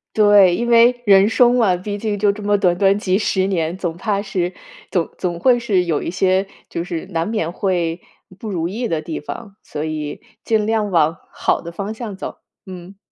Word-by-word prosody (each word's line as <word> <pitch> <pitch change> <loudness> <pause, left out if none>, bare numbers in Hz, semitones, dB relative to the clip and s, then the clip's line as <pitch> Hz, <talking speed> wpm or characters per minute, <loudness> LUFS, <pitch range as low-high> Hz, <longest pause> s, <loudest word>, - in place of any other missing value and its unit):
对， 205 -4 +6
因 235 - -2
为 240 +1 +5
人 195 0 +6
生 240 +2 +4
嘛， 210 -7 +3
毕 205 +3 -5
竟 210 -1 -2
就 205 0 +3
这 210 +1 -9
么 205 0 +2
短 180 -3 +2
短 195 +2 +3
几 190 -2 +1
10 190 -3 0
年， 170 -3 -1
总 175 -3 -4
怕 200 +2 -1
是， 185 -3 -2 0.4
总 175 -3 0
总 175 -2 -2
会 245 +6 +4
是 205 -6 +1
有 165 -4 -1
一 - - -3
些 190 +1 +1 0.2
就 170 - -3
是 170 -2 -5
难 165 0 -1
免 190 -7 -2
会 175 -3 -1 0.4
不 220 - -7
如 170 -3 -2
意 230 +6 -3
的 160 -5 -1
地 160 0 -5
方。 200 +6 -8
所 150 0 -5
以， 155 -2 -5 0.2
尽 220 -2 +1
量 215 -2 0
往 165 -2 +2
好 - - 0
的 170 - -8
方 200 +4 -4
向 220 -4 -6
走， 190 - -7 0.3
嗯。 185 +1 -10
195 Hz, 215 characters per minute, -19 LUFS, 175-210 Hz, 0.4 s, 对